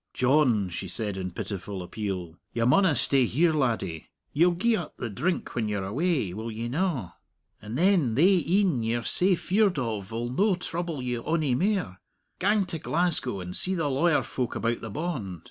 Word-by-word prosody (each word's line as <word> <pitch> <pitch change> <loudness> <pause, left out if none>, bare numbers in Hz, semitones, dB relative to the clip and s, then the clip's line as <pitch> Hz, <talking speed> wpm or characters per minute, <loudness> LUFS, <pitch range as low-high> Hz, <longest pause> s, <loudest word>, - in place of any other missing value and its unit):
"John," 125 -7 +3
she 95 +3 -5
said, 105 +2 -2
in 95 -1 -4
pitiful 95 +1 -5
appeal, 90 -4 -5 0.2
"you 115 -1 0
maunna 160 +5 +4
stay 130 +1 +3
here, 160 +7 +2
laddie. 110 - -1 0.2
Ye'll 175 +3 +3
gie 230 +6 +2
up 175 -7 -6
the 120 - -4
drink 170 - -2
when 110 -3 -1
you're 100 -2 -2
away 130 - 0
will 110 +4 -5
ye 115 +2 -4
na? 140 - -1 0.5
and 110 +3 -5
then 170 - +3
thae 180 +4 +4
een 175 - +2
ye're 115 +1 -1
sae 185 - +3
feared 195 +1 +1
of'll 115 0 -3
no 195 +8 +2
trouble 170 -5 -4
you 125 -2 -2
ony 155 -5 0
mair. 165 - -1 0.4
Gang 205 +1 +2
to 165 -3 -4
Glasgow 155 - -1
and 90 0 -6
see 190 +1 +4
the 160 -4 0
lawyer 160 +4 +2
folk 125 -3 -3
about 115 0 -1
the 115 - -6
bond. 115 - -4
130 Hz, 180 wpm, -27 LUFS, 110-175 Hz, 0.5 s, maunna